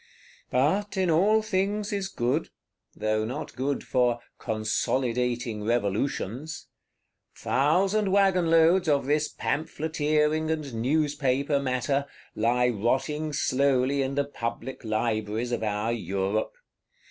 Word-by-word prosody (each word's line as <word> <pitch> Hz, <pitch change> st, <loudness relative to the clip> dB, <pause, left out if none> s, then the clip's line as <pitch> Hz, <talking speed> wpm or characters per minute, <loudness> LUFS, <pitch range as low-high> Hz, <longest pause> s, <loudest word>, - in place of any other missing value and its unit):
But 190 Hz, +11 st, +1 dB
in 185 Hz, -3 st, +2 dB
all 210 Hz, +7 st, +4 dB
things 205 Hz, +1 st, -1 dB
is 200 Hz, -1 st, -1 dB
good;—though 120 Hz, -, -3 dB
not 115 Hz, +4 st, -5 dB
good 135 Hz, +2 st, -2 dB
for 125 Hz, -2 st, +1 dB, 0.2 s
"consolidating 120 Hz, 0 st, -1 dB
Revolutions." 120 Hz, +6 st, -2 dB, 0.7 s
Thousand 190 Hz, +8 st, +2 dB
wagon 190 Hz, -4 st, +3 dB
loads 165 Hz, +2 st, +4 dB
of 140 Hz, -3 st, +2 dB
this 150 Hz, +2 st, +1 dB
Pamphleteering 155 Hz, +1 st, 0 dB
and 155 Hz, -5 st, -2 dB
Newspaper 140 Hz, +2 st, +1 dB
matter, 135 Hz, +1 st, -1 dB, 0.3 s
lie 125 Hz, +3 st, +2 dB
rotting 135 Hz, +8 st, -1 dB
slowly 140 Hz, 0 st, +2 dB
in 135 Hz, 0 st, -2 dB
the 140 Hz, 0 st, +1 dB
Public 120 Hz, -1 st, -5 dB
Libraries 110 Hz, +1 st, -1 dB
of 120 Hz, -, -1 dB
our 105 Hz, +1 st, -1 dB
Europe. 100 Hz, -1 st, -2 dB
140 Hz, 105 wpm, -27 LUFS, 120-155 Hz, 0.7 s, all